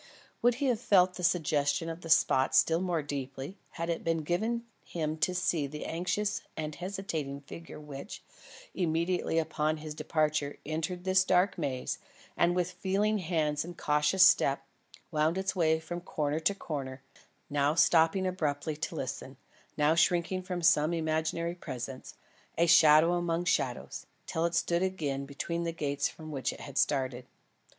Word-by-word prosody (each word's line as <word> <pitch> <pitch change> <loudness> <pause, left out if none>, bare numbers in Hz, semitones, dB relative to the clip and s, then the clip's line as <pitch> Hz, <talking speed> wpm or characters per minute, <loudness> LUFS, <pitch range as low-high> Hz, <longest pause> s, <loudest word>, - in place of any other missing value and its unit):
Would 240 0 +4
he 280 +3 -2
have 245 -5 +2
felt 185 -5 +4
the 180 - -7
suggestion 150 -3 +1
of 165 +1 -5
the 165 - -8
spot 135 -4 +4
still 165 +1 +4
more 175 -4 -1
deeply, 140 +4 -6
had 170 0 -3
it 170 -1 -2
been 165 -1 0
given 220 +9 -1 0.2
him 155 -2 -3
to 180 +4 0
see 170 -5 0
the 150 +2 -7
anxious 185 +5 -1 0.2
and 155 -1 -3
hesitating 165 -6 -4
figure 165 +3 -10
which, 145 +3 -9 0.5
immediately 170 0 0
upon 155 -1 0
his 155 0 -7
departure 150 -2 -1
entered 160 +4 -3
this 185 0 +4
dark 185 +1 +3
maze, 140 -7 -3 0.4
and 175 +1 +2
with 180 0 0
feeling 200 +4 0
hands 155 -4 0
and 175 +1 -9
cautious 150 +5 +4
step, 135 0 +4 0.5
wound 155 +2 +1
its 190 0 -1
way 160 -3 +3
from 175 +2 -6
corner 150 -3 -2
to 200 +5 +1
corner 135 -7 -5 0.4
now 145 +1 +1
stopping 165 +2 +4
abruptly 155 -4 -1
to - - -4
listen, - - -5 0.4
now 150 +1 +4
shrinking 175 +2 +2
from 180 -2 -4
some 165 -1 +4
imaginary 160 +1 -1
presence 130 -6 -7 0.4
a 170 - +4
shadow 160 0 +6
among 175 0 0
shadows 130 -8 -1 0.2
till 165 +1 0
it 170 - -4
stood 170 +1 +1
again 145 -8 -2
between 170 +4 -3
the 170 - -1
gates 145 -3 -1
from 155 -1 -10
which 135 -2 -2
it - - -10
had 140 - -3
started. 130 -3 0
165 Hz, 160 wpm, -30 LUFS, 150-180 Hz, 0.5 s, shadow